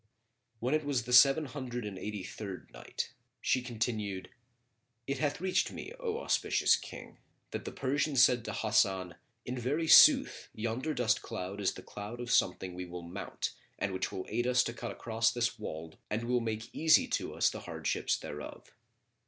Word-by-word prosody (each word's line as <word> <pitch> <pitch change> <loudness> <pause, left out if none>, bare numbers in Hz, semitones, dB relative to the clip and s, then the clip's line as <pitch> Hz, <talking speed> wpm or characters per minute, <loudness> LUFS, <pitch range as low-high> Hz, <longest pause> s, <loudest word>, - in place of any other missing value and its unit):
When 125 +5 0
it 155 0 +2
was 140 -4 0
the 125 +1 -4
Seven 135 +4 +7
Hundred 125 -4 -5
and 105 -2 -5
Eighty 105 0 -5
third 95 0 -7
Night, - - -5 0.3
She 130 - +1
continued, 110 -5 -3 0.8
It 140 0 -2
hath 145 -2 0
reached 185 +1 +1
me, - - -7
O 460 -3 -2
auspicious - - +3
King, - - -9 0.3
that - - -5
the - - -4
Persian 140 +2 -1
said 125 -2 +5
to - - -3
Hasan, 95 -4 +1 0.3
"In 125 +1 -4
very 145 +7 -1
sooth - - +7
yonder 120 +7 -2
dust 125 -2 +2
cloud 100 -2 -5
is 95 - +1
the - - -10
cloud 105 +4 -8
of 120 0 -4
something 95 -6 +2
we 90 +1 -5
will 90 0 -8
mount 90 +4 -4 0.3
and 95 - -2
which 95 0 -2
will 95 - -5
aid 120 +3 -1
us 125 0 +4
to 120 - -4
cut - - -6
across 115 0 0
this 115 -2 -1
wold 80 -5 -7
and 110 +2 -1
will 125 +1 +1
make 110 -1 -4
easy 160 0 +5
to - - -2
us - - +3
the - - -6
hardships - - -1
thereof." 75 0 -8
115 Hz, 180 wpm, -32 LUFS, 100-130 Hz, 0.8 s, Seven